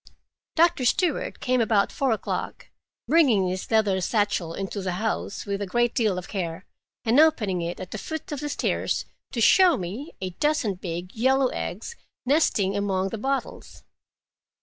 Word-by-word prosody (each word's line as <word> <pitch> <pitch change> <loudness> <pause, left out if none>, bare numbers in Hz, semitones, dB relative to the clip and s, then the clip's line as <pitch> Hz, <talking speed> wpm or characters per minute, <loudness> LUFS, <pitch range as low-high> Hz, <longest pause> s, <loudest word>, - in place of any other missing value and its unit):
Doctor 330 -5 +3
Stewart 365 - 0
came 255 -1 +1
about 215 -3 +2
four 275 - 0
o'clock, 220 - -4 0.4
bringing 255 - +4
his 185 +1 -4
leather 210 -4 +2
satchel 205 -4 0
into 195 +1 -4
the 185 -1 -2
house 215 +1 -3
with 200 -1 -3
a 200 - -2
great 240 +5 +1
deal 215 -6 +1
of 180 - -6
care, 180 -2 -4 0.4
and 235 +5 +4
opening 225 - +3
it 170 +1 -4
at 185 - -8
the 215 - -5
foot 315 +5 -6
of 295 - -3
the 295 - -4
stairs 285 - -1 0.3
to 245 - -3
show 360 - +6
me 210 - -6
a 185 -1 -4
dozen 295 - 0
big 180 0 -6
yellow 260 +3 +3
eggs 215 - -5 0.3
nesting 230 -9 +2
among 195 -1 0
the 220 - -5
bottles. 270 +4 -4
215 Hz, 165 wpm, -25 LUFS, 190-270 Hz, 0.4 s, show